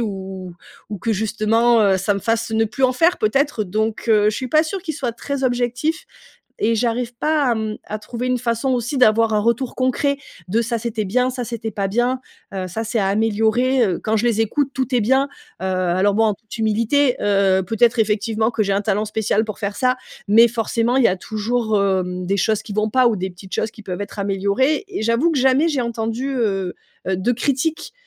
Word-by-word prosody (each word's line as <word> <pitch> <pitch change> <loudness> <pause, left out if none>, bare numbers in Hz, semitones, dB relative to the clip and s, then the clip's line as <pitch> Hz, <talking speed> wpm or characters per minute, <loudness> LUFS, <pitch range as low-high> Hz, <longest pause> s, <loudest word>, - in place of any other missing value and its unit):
ou 195 -4 -3 0.2
ou 180 - -9 0.4
ou 205 - -4
que 225 +5 -1
justement, 225 +3 +2
heu, 195 -2 +4
ça 200 +2 0
me 200 - -2
fasse 225 +2 -1
ne 225 0 +2
plus 240 +5 -6
en 255 - +3
faire 330 +7 +3
peut-être. 235 +1 +1
Donc, 215 +3 -2
heu, 210 -1 +4
je 215 - -5
suis 255 - -4
pas 310 +4 +4
sûre 360 +3 -4
qu'ils 320 -4 -4
soient 255 -5 -3
très 280 +3 -5
objectifs 245 +6 -1 0.6
et 230 +2 +2
j'arrive 235 +1 -1
pas 300 +4 +1
à - - +1
mmh, 220 -1 -3
à 215 - -5
trouver 235 +3 -5
une 255 0 +1
façon 235 +2 -1
aussi 250 +2 -1
d'avoir 225 -2 +4
un - - +3
retour 235 +4 0
concret 260 +2 +1 0.3
de 220 +5 +1
ça 235 +1 -1
c'était 220 -1 -3
bien 250 +6 +1
ça 250 -1 -4
c'était 230 -1 -5
pas 200 -1 -2
bien, 240 +5 0 0.3
heu, 190 -1 -3
ça 185 +5 -4
c'est 225 +1 -2
à 195 - +1
améliorer, 225 +5 +2
heu. 180 -4 -2
Quand 220 0 0
je 215 - 0
les 225 -2 +1
écoute 275 +6 0
tout 260 0 -2
est 245 - +3
bien, 265 +5 +2 0.3
heu, - - -3
alors 185 +1 +1
bon 225 +2 +3
en 215 -2 +2
toute 220 +2 -11
humilité, 230 +5 +2
heu, 195 -2 +2
peut-être 225 +4 +2
effectivement 220 +1 +1
que 225 -2 0
j'ai 200 - 0
un 195 - +1
talent 210 0 0
spécial 215 0 0
pour 215 -1 -6
faire 205 -1 -3
ça, 255 +1 +2 0.3
mais 225 +3 +6
forcément 230 +2 0
il 265 - +4
y - - +7
a 185 - 0
toujours, 220 +2 -1
hem, 185 -2 -1
des 195 +2 +1
choses 215 +2 +1
qui 210 - -8
vont 215 +1 0
pas 255 +1 +4
ou 235 - +3
des 190 0 -3
petites 185 +2 -10
choses 220 - -1
qui 215 - -14
peuvent 180 +1 -5
être 205 +1 -7
améliorées 200 - 0
et 375 - -4
j'avoue 230 +9 +2
que 310 - 0
jamais 265 +5 +3
j'ai 285 -5 0
entendu, 235 +2 -2
heu, 195 -6 -1 0.3
heu, 190 0 0
de 190 +6 0
critiques, 280 +7 -1
225 Hz, 225 wpm, -20 LUFS, 205-250 Hz, 0.6 s, y